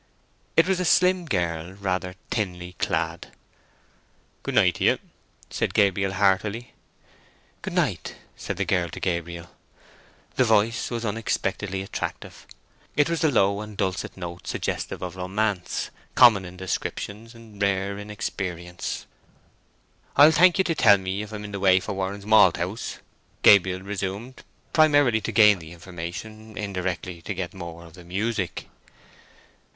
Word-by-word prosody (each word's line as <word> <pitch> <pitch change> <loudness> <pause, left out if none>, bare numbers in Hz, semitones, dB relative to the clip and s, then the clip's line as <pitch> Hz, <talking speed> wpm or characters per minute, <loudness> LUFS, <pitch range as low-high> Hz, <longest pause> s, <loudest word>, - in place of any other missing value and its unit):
It 165 - +6
was 190 -1 +1
a - - 0
slim 180 +1 +3
girl, 85 - -2
rather 95 -2 -3 0.2
thinly 90 -5 -3
clad. 85 -1 -1 1.1
"Good - - -4
night - - +5
to - - -3
you," - - +4 0.5
said - - -2
Gabriel, 95 -1 +2
heartily. 100 +4 +1 0.9
"Good - - -5
night," - - -1 0.2
said - - -5
the - - 0
girl 90 -3 +1
to - - -8
Gabriel. 85 -1 -3 0.9
The - - +5
voice 110 0 +2
was 120 -1 -3
unexpectedly 100 -3 -2
attractive; 95 - -6 0.5
it 145 +3 +3
was 170 - -1
the 160 - +4
low 100 -5 +2
and 105 -1 -9
dulcet 95 0 -2
note 85 -1 -7
suggestive - - -3
of 90 0 -6
romance; 95 0 -2 0.2
common 110 -6 +7
in 90 0 -10
descriptions, 105 +5 -4
rare 100 -3 -2
in 105 +1 -8
experience. 90 -4 -4 1.1
"I'll 145 +3 +8
thank 175 +2 +5
you 190 - +4
to 170 - 0
tell 105 -9 +6
me 95 +1 -3
if 105 0 -8
I'm 105 -1 -6
in 105 - -8
the 100 - -4
way 95 -1 +5
for 95 - -5
Warren's 95 +1 -4
Malthouse?" 100 -1 +3 0.5
Gabriel 95 -2 +6
resumed, 100 +5 -5 0.3
primarily 145 -7 +4
to - - -3
gain 105 -4 +6
the 80 -1 -11
information, 95 +6 -8
indirectly 90 -3 -4
to 100 +4 -5
get 90 -1 -4
more 85 -2 -8
of 80 - -15
the 90 0 -13
music. 100 +2 -3
100 Hz, 145 wpm, -25 LUFS, 90-110 Hz, 1.1 s, I'll